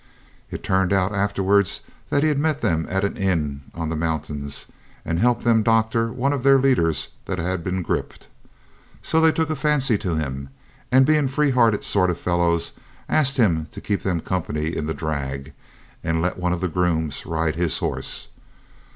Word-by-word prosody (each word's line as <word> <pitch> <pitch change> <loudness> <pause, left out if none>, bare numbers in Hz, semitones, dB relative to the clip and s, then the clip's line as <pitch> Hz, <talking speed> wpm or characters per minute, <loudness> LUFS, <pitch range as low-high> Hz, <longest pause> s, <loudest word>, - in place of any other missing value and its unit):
It - - -7
turned 95 -1 +1
out 95 +1 +1
afterwards 100 -1 +1 0.3
that 145 - +2
he'd 150 -2 +2
met 155 0 0
them 80 -1 0
at 95 +1 0
an 100 - -1
inn 80 -8 -1
on 80 -1 -3
the 80 - -2
mountains, 75 -3 -3 0.4
and 85 0 -1
helped 120 +2 +2
them 115 -1 +4
to - - 0
doctor 115 +1 +2
one 135 +4 0
of 140 - -2
their 135 +1 +6
leaders 85 - +2 0.2
that 95 - -3
had 90 0 -2
been 90 +1 -2
griped. - - -4 0.8
So 160 - +2
they 160 0 +6
took 160 0 -1
a - - 0
fancy 135 -8 +1
to 90 -3 -2
him, 70 -3 -4 0.4
and, 130 +1 +6
being 150 -1 +3
free 145 +2 +1
hearted 115 -4 +3
sort 95 -3 +3
of 85 - -2
fellows, 85 -1 +1 0.3
asked 140 -3 +2
him 85 -10 +2
to - - -9
keep 100 -1 -2
them 90 -4 -1
company 80 -3 -2
in 75 - -3
the 80 - -2
drag, 70 -3 -4 0.5
and 80 0 0
let 90 +2 -1
one 90 0 0
of 90 0 -2
the 95 - +1
grooms 80 -3 -1
ride 80 -1 -1
his 85 -1 +2
horse. - - -1
95 Hz, 185 wpm, -22 LUFS, 80-120 Hz, 0.8 s, their